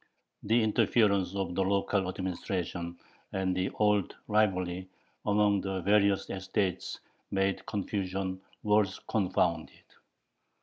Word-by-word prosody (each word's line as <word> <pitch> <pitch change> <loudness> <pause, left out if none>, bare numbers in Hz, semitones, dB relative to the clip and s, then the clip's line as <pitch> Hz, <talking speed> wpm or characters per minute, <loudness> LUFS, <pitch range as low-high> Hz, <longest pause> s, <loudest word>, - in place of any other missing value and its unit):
The 115 +2 +3
interference 100 -3 +2
of 95 -3 -2
the 95 - +1
local 100 0 +1
administration 90 -2 -3 0.4
and 95 -1 0
the 95 +1 0
old 105 -3 +2
rivalry 95 -4 +1 0.4
among 105 -1 +3
the 95 -1 -2
various 100 +1 +3
estates 95 -1 -2 0.3
made 95 0 0
confusion 95 -2 -2 0.2
worse 105 -2 +2
confounded. 90 -5 0
95 Hz, 100 wpm, -30 LUFS, 95-105 Hz, 0.4 s, The